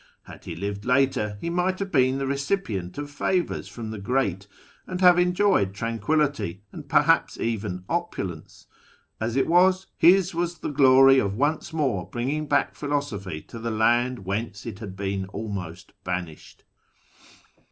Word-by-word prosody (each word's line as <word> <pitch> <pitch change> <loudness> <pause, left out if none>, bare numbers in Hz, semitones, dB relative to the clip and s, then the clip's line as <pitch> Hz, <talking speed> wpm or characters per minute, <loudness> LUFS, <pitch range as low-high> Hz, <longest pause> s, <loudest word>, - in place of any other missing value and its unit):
Had - - -13
he 85 - -6
lived 100 +3 -4
later, 125 -5 +1
he 170 - -3
might 180 +2 0
have 195 0 -4
been 130 -1 +3
the 135 - -2
recipient 140 - -2
of 145 0 -5
favours 175 +4 -1
from 110 -2 -7
the 110 - -6
great, 100 -3 -1 0.4
and 180 -1 -4
have 180 -1 +6
enjoyed 180 - +2
tranquillity, 115 - -1
and - - -10
perhaps - - +3
even 105 -5 -3
opulence: 100 - -4 0.5
as 115 +1 -2
it 135 - +3
was, 185 +2 +4
his 185 +1 +5
was 170 0 -2
the - - -4
glory 135 -1 +6
of 100 -4 -1
once 150 +6 0
more 135 - -1
bringing 140 +6 -2
back 145 0 +1
philosophy 110 - -3
to 115 - -10
the 115 +1 -3
land 120 0 +1
whence 100 +1 -4
it 110 -4 -7
had 100 -4 -7
been 95 -1 -3
almost 95 -4 -6
banished. 90 -3 -6
125 Hz, 150 wpm, -25 LUFS, 100-155 Hz, 0.5 s, have